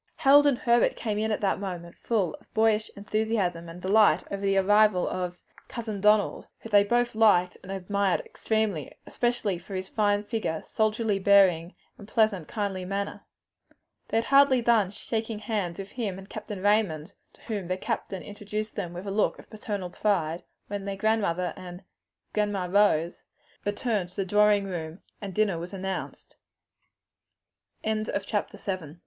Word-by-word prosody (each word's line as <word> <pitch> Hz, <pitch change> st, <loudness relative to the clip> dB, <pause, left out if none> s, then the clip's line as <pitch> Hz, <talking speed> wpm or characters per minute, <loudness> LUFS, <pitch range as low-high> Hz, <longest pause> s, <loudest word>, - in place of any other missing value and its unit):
Harold 290 Hz, -1 st, +6 dB
and 275 Hz, -4 st, +3 dB
Herbert 235 Hz, -1 st, +3 dB
came 210 Hz, -3 st, -2 dB
in 220 Hz, +1 st, 0 dB
at 215 Hz, -, -1 dB
that 195 Hz, -2 st, +1 dB
moment 175 Hz, -3 st, -6 dB
full 205 Hz, -7 st, 0 dB
of -, -, -27 dB
boyish 220 Hz, 0 st, +2 dB
enthusiasm 200 Hz, -5 st, -1 dB
and 165 Hz, +2 st, -9 dB
delight 210 Hz, +3 st, +4 dB
over 200 Hz, -, -3 dB
the 195 Hz, -1 st, +2 dB
arrival 205 Hz, -1 st, +4 dB
of 180 Hz, -1 st, -4 dB, 0.2 s
"Cousin 220 Hz, -4 st, -5 dB
Donald," 210 Hz, 0 st, +3 dB
whom 225 Hz, -, -10 dB
they 205 Hz, -1 st, +7 dB, 0.3 s
liked 205 Hz, -5 st, +4 dB
and 190 Hz, -, -9 dB
admired 195 Hz, 0 st, 0 dB
extremely; 215 Hz, -, -1 dB
in -, -, -16 dB
especial 230 Hz, -7 st, -1 dB
for 190 Hz, +3 st, -9 dB
his 185 Hz, 0 st, -4 dB
fine 205 Hz, -1 st, +1 dB
figure, 210 Hz, -8 st, -3 dB
soldierly 215 Hz, -1 st, 0 dB
bearing, 190 Hz, -3 st, +4 dB, 0.2 s
and 200 Hz, -, -11 dB
pleasant, 215 Hz, -7 st, +1 dB
kindly 200 Hz, -4 st, -3 dB
manner. 200 Hz, +2 st, -3 dB, 0.9 s
They -, -, 0 dB
had 225 Hz, -, +2 dB
hardly 275 Hz, -2 st, +6 dB
done 225 Hz, -5 st, +3 dB
shaking 220 Hz, +2 st, -4 dB
hands 210 Hz, -6 st, -3 dB
with 195 Hz, 0 st, -7 dB
him 210 Hz, -7 st, -3 dB
and 195 Hz, 0 st, -10 dB
Captain 210 Hz, -2 st, -7 dB
Raymond, 205 Hz, -7 st, +1 dB, 0.2 s
to -, -, -23 dB
whom 205 Hz, -6 st, -4 dB
their 185 Hz, +1 st, -1 dB
grandfather 190 Hz, 0 st, -4 dB
introduced 210 Hz, +1 st, -5 dB
them 175 Hz, -4 st, -4 dB
with 175 Hz, +3 st, -7 dB
a 200 Hz, -, -3 dB
look 210 Hz, +2 st, +1 dB
of -, -, -15 dB
paternal 205 Hz, -4 st, -5 dB
pride, 175 Hz, -5 st, 0 dB, 0.2 s
when 200 Hz, -1 st, -5 dB
their 200 Hz, -1 st, -4 dB, 0.2 s
mother 180 Hz, -3 st, -1 dB
and 180 Hz, 0 st, -9 dB, 0.5 s
"Grandma 205 Hz, -3 st, 0 dB
Rose" 180 Hz, -3 st, +2 dB, 0.4 s
returned 205 Hz, -2 st, -1 dB
to 180 Hz, -, -19 dB
the 195 Hz, -, -1 dB
drawing 205 Hz, +1 st, +4 dB
room, 170 Hz, -3 st, -6 dB, 0.2 s
and 200 Hz, -2 st, -5 dB
dinner 205 Hz, -6 st, +1 dB
was 175 Hz, +3 st, -7 dB
announced. 190 Hz, 0 st, -5 dB, 1.5 s
CHAPTER 215 Hz, -1 st, -2 dB
VIII. 180 Hz, -5 st, -5 dB
200 Hz, 160 wpm, -27 LUFS, 185-215 Hz, 1.5 s, they